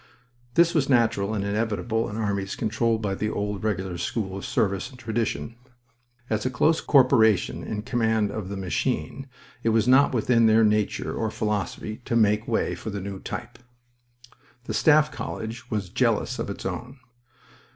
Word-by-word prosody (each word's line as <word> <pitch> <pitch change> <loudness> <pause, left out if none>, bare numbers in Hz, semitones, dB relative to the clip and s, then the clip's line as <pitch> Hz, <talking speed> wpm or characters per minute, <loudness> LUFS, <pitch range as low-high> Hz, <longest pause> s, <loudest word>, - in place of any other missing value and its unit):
This 170 0 +5
was 145 -4 +1
natural 115 -4 +2
and 100 - -1
inevitable 110 +2 -1
in 105 - -6
armies 100 -3 -2
controlled 110 0 0
by 100 -2 -1
the 105 +2 -2
old 105 -2 -3
Regular 95 -4 -2
school 95 +1 -3
of 95 - -6
service 100 0 0
and 130 - -14
tradition. 115 -1 -2 0.7
As 110 -3 -1
a 130 - 0
close 155 +6 +2
corporation 120 - +4
in 105 -1 -4
command 110 -4 +1
of 100 -3 -5
the 100 - -4
machine, 95 - -2 0.3
it 115 - +1
was 115 0 +2
not 135 +3 +6
within 115 -1 +3
their 110 +1 +5
nature 105 -1 +1
or 110 - -1
philosophy 105 +1 -3
to 115 - -1
make 105 -1 +3
way 115 - 0
for - - -6
the 100 -1 -4
new 100 0 -6
type. 120 +4 -7 1.0
The - - -5
Staff 155 0 +4
College 115 +2 -6
was 105 -5 -2
jealous 120 +3 0
of - - -3
its 100 - -6
own. 120 +8 -5
110 Hz, 165 wpm, -25 LUFS, 100-120 Hz, 1.0 s, not